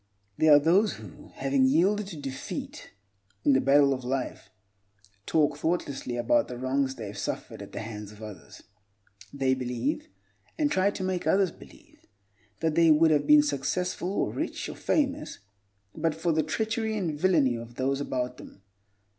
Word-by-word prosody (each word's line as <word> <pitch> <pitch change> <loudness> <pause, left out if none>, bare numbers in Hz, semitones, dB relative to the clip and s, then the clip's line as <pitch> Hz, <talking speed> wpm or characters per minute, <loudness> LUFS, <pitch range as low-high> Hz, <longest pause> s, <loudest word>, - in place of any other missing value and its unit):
There 155 +6 +4
are 145 - +10
those 185 +8 +3
who, 105 -5 -12
having 135 -1 +2
yielded 190 +9 +2
to 180 -5 -8
defeat 135 -2 -6 0.6
in 140 - +5
the 130 - +4
battle 140 +1 +5
of 130 -1 -5
life, 130 +1 -3 0.8
talk 150 -2 +2
thoughtlessly 140 -7 -2
about 290 - +2
the 125 - -7
wrongs 130 +1 0
they 115 - -7
have 100 0 -7
suffered - - -5
at - - -10
the - - -5
hands 105 -2 -7
of 105 +1 -13
others. 105 -5 -11 0.7
They 135 -2 +1
believe—and 290 - -4
try 190 +1 +3
to 200 - -5
make 185 -1 -2
others 190 -2 +3
believe—that 105 +8 -9
they 165 +1 +5
would 160 +1 +5
have 150 -2 +2
been 300 0 +7
successful 180 - -2
or - - -1
rich - - -3
or - - -7
famous 285 0 -1 0.6
but 160 -1 -1
for 160 +1 0
the 160 0 +2
treachery 220 +7 -2
and 175 -6 -1
villainy 150 -5 +3
of 115 0 -8
those 135 +2 -1
about 125 -2 -3
them. 95 - -14
145 Hz, 165 wpm, -27 LUFS, 130-185 Hz, 0.8 s, are